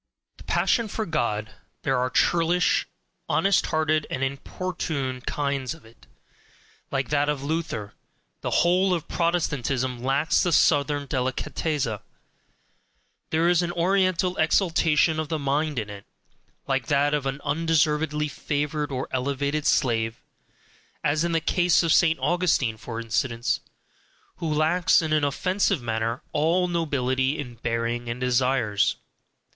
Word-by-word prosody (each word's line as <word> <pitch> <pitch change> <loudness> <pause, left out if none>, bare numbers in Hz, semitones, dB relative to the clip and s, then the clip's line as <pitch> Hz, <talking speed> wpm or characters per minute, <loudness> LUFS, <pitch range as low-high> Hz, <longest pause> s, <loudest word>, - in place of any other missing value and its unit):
The - - -13
passion 230 -2 +1
for 220 +1 -3
God: 115 - -1 0.3
there 135 -2 +1
are 125 0 0
churlish, 175 +4 +2 0.4
honest 195 -1 +2
hearted, 155 -1 +1
and 130 - -2
importunate 140 -2 -3
kinds 140 0 -2
of 155 - -19
it, 110 - -20 0.8
like 135 -1 -2
that 145 0 +1
of 145 -2 -2
Luther 150 -9 -3 0.5
the - - -2 0.2
whole 180 +1 +3
of 165 - -5
Protestantism 135 -7 -1
lacks 140 +5 +2
the 175 - +1
southern 145 -2 +3
DELICATEZZA. 130 -1 -2 1.3
There 160 +2 +2
is 175 0 +4
an 175 0 -2
Oriental 185 0 +1
exaltation 160 -2 +2
of 155 -1 -3
the 160 - -1
mind 145 +1 -1
in 110 -3 -2
it, 100 -1 -11 0.6
like 135 -4 -1
that 145 0 +2
of 145 -2 0
an 135 +1 -3
undeservedly 150 -1 +1
favoured 150 +1 -2
or 130 0 -3
elevated 140 +3 -1
slave, 115 -2 +1 0.8
as 150 +2 +1
in 170 - 0
the 165 - +2
case 175 +1 +2
of 165 - +3
St. 165 -2 +4
Augustine, 165 -10 +1
for 115 +1 -6
instance, 115 +2 -1 0.8
who 165 -2 -3
lacks 165 +4 +3
in 155 -1 -1
an 155 -1 +2
offensive 185 +2 0
manner, 115 +1 -2
all 170 +5 +2
nobility 140 -5 0
in 125 -4 -6
bearing 115 +1 -2
and 120 +1 -4
desires. 125 -4 +1
145 Hz, 135 wpm, -25 LUFS, 130-165 Hz, 1.3 s, is